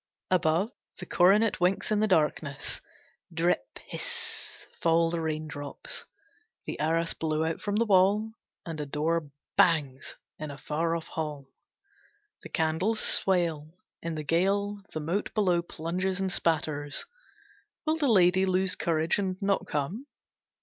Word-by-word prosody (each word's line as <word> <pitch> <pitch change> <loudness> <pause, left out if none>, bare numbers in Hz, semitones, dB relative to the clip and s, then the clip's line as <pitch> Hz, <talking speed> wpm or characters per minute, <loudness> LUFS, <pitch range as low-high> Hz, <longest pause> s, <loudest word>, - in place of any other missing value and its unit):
Above, 180 +4 +2 0.3
the 180 - -7
coronet 200 +6 +4
winks 180 +4 +1
in 210 - +3
the 215 - +3
darkness. 150 -5 0 0.5
Drip 165 -9 0
hiss - - -5 0.2
fall 165 0 +3
the 170 -1 -1
raindrops. 155 -2 -4 0.6
The - - -5
arras 165 +2 +1
blows 160 0 0
out 165 - -3
from 205 -1 -1
the 230 +2 +3
wall, 205 +2 +4 0.3
and 160 -2 -4
a 145 - -4
door 155 +2 0 0.3
bangs 145 -6 +3 0.2
in 155 -1 -4
a 140 - -7
far 165 +3 -1
off 165 - -4
hall. 150 -3 -4 1.0
The - - -10
candles 160 +8 +1
swale. 165 -4 +1 0.3
In 165 -1 -3
the 155 - -4
gale 200 +6 +1
the 155 - -3
moat 170 +7 -2
below 180 -5 +3
plunges 180 +3 -2
and 190 -1 0
spatters. 150 -4 0 0.8
Will 315 +1 +2
the 295 -3 +1
lady 190 -4 +5
lose 185 0 +2
courage 160 +2 +1
and 190 -2 -2
not 200 -1 0
come? 175 - -2
170 Hz, 140 wpm, -28 LUFS, 155-190 Hz, 1.0 s, lady